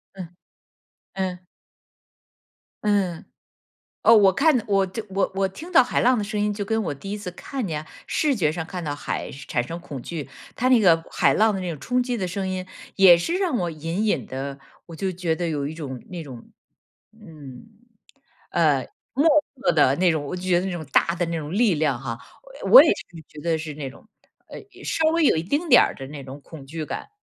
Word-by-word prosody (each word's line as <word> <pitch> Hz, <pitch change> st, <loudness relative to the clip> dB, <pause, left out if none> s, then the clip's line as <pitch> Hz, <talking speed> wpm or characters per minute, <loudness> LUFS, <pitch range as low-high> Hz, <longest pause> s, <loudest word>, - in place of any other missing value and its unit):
嗯， 185 Hz, -3 st, -7 dB, 0.9 s
嗯。 185 Hz, -2 st, -2 dB, 1.5 s
嗯， 195 Hz, -5 st, 0 dB, 0.8 s
哦， 230 Hz, -, +6 dB
我 200 Hz, -3 st, +6 dB
看 275 Hz, -5 st, +3 dB
我 195 Hz, -2 st, +3 dB
就 215 Hz, +4 st, -6 dB
我 195 Hz, +1 st, 0 dB
我 195 Hz, 0 st, +1 dB
听 320 Hz, -, -10 dB
到 260 Hz, -, +7 dB
海 -, -, 0 dB
浪 250 Hz, +1 st, +4 dB
的 210 Hz, -, -1 dB
声 210 Hz, +1 st, -3 dB
音， 210 Hz, 0 st, 0 dB
就 205 Hz, 0 st, -4 dB
跟 220 Hz, +2 st, 0 dB
我 155 Hz, -, -2 dB
第 195 Hz, +9 st, -8 dB
1 210 Hz, -, -3 dB
次 195 Hz, -4 st, -6 dB
看 260 Hz, +6 st, -5 dB
见 155 Hz, -4 st, -4 dB, 0.2 s
视 295 Hz, -4 st, +1 dB
觉 155 Hz, -8 st, +1 dB
上 160 Hz, 0 st, -4 dB
看 180 Hz, 0 st, -6 dB
到 145 Hz, -2 st, -3 dB
海 -, -, -4 dB
产 135 Hz, -2 st, -3 dB
生 165 Hz, +7 st, -6 dB
恐 140 Hz, -6 st, -8 dB
惧。 150 Hz, -1 st, -6 dB, 0.3 s
它 250 Hz, -, 0 dB
那 250 Hz, -, +6 dB
个 170 Hz, -6 st, +5 dB
海 -, -, +3 dB
浪 220 Hz, 0 st, +3 dB
的 195 Hz, -, -3 dB
那 180 Hz, -, -3 dB
种 155 Hz, -, -6 dB
冲 250 Hz, -, 0 dB
击 245 Hz, -1 st, -2 dB
的 190 Hz, -4 st, -2 dB
声 190 Hz, +2 st, -3 dB
音 185 Hz, 0 st, -3 dB, 0.3 s
也 185 Hz, -3 st, +8 dB
是 330 Hz, -, -2 dB
让 350 Hz, -10 st, 0 dB
我 175 Hz, -3 st, -2 dB
隐 165 Hz, +7 st, -3 dB
隐 215 Hz, -, 0 dB
地， 135 Hz, +1 st, -5 dB, 0.3 s
我 165 Hz, -, -9 dB
就 190 Hz, +2 st, -2 dB
觉 170 Hz, -2 st, -1 dB
得 175 Hz, 0 st, -2 dB
有 145 Hz, -3 st, -2 dB
一 155 Hz, -, -6 dB
种， 135 Hz, -6 st, -7 dB
那 175 Hz, -2 st, -6 dB
种 125 Hz, -5 st, -11 dB, 0.6 s
嗯， 155 Hz, -, -13 dB, 0.8 s
呃， 150 Hz, -6 st, +2 dB, 0.3 s
莫 280 Hz, +5 st, +1 dB, 0.3 s
测 265 Hz, +1 st, +1 dB
的 140 Hz, -3 st, +4 dB
那 180 Hz, 0 st, +3 dB
种， 155 Hz, -2 st, -2 dB
我 160 Hz, -, -4 dB
就 180 Hz, -, -7 dB
觉 180 Hz, -1 st, +2 dB
得 185 Hz, -, -3 dB
那 190 Hz, -, -2 dB
种 170 Hz, -2 st, -5 dB
大 170 Hz, -, +3 dB
的 175 Hz, -, -1 dB
那 165 Hz, 0 st, -2 dB
种 150 Hz, -1 st, -6 dB
力 210 Hz, -3 st, +3 dB
量 145 Hz, -5 st, 0 dB
哈， 115 Hz, -1 st, -5 dB, 0.4 s
呃， -, -, -2 dB
我 -, -, +12 dB
也 -, -, +3 dB
是 -, -, -4 dB, 0.2 s
觉 150 Hz, -, -12 dB
得 165 Hz, 0 st, 0 dB
是 155 Hz, -1 st, -6 dB
那 140 Hz, -3 st, -5 dB
种， 135 Hz, -, -17 dB, 0.4 s
呃， -, -, -9 dB, 0.2 s
稍 320 Hz, -1 st, +1 dB
微 335 Hz, -1 st, +2 dB
有 165 Hz, -, +4 dB
一 160 Hz, -, -1 dB
丁 295 Hz, -, -1 dB
点 245 Hz, -, +8 dB
儿 -, -, 0 dB
的 135 Hz, -1 st, -8 dB
那 140 Hz, -1 st, -8 dB
种 135 Hz, +2 st, -10 dB
恐 145 Hz, -1 st, -12 dB
惧 155 Hz, +3 st, -5 dB
感。 -, -, -6 dB
180 Hz, 235 characters per minute, -23 LUFS, 155-210 Hz, 1.5 s, 我